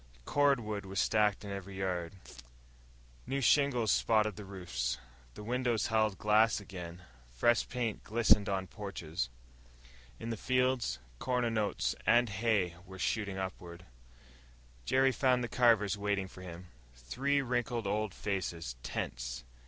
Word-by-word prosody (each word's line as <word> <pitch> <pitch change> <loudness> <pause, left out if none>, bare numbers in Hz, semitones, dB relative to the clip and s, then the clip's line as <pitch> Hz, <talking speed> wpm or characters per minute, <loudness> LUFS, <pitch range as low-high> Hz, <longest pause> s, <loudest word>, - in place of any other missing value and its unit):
Cordwood 120 -8 +2
was 95 0 -3
stacked 105 -1 +2
in 100 - -5
every 100 0 -6
yard. 90 -2 -2 1.1
New 140 - -1
shingles 130 -3 +3
spotted 110 -1 +3
the 105 - -8
roofs, 90 -11 -3 0.4
the - - -8
windows 120 -1 0
held 110 -3 +2
glass 110 +1 +4
again, 90 -3 -8 0.3
fresh 105 - +2
paint 120 -4 -2
glistened 110 -2 +4
on 95 -1 -1
porches. 90 - -4 0.9
In 115 - -4
the 115 - -3
fields, 125 - +1 0.2
corn 125 -1 0
and 115 -1 0
oats 65 - 0
and 120 +2 +5
hay 100 -4 +1
were 95 0 -11
shooting 100 0 -1
upward.... 90 -2 -6 1.0
Jerry 135 - +4
found 125 +1 +2
the - - -1
Carvers 110 -4 +3
waiting 100 -2 0
for 90 - -13
him, 90 -1 -9 0.5
their 140 +2 +2
wrinkled 120 -2 -1
old 105 +1 0
faces 85 -9 -3
tense. - - -4
105 Hz, 135 wpm, -32 LUFS, 95-120 Hz, 1.1 s, and